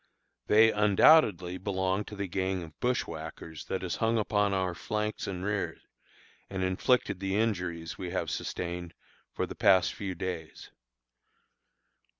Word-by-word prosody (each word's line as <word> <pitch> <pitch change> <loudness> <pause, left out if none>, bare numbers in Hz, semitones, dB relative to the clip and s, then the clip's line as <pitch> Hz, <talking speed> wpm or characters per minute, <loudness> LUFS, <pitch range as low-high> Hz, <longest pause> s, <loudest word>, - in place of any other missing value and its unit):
They 110 +1 +6
undoubtedly 105 - +4
belong 95 0 -1
to 105 - -9
the 100 -1 -3
gang 95 0 -1
of 80 -2 -13
bushwhackers 80 - -3
that 95 - -3
has 90 - -2
hung 115 0 +1
upon 105 -1 +1
our 95 -2 0
flanks 105 +4 -3
and 95 -1 -4
rear, 100 -1 -2 0.7
and 95 -1 -3
inflicted 95 +2 +1
the 95 0 -2
injuries 90 -7 -1
we 90 - -4
have - - -2
sustained 85 -1 -4 0.4
for - - -2
the - - -7
past 95 -2 +4
few 95 -3 -5
days. 85 -3 -6
95 Hz, 140 wpm, -29 LUFS, 90-105 Hz, 0.7 s, They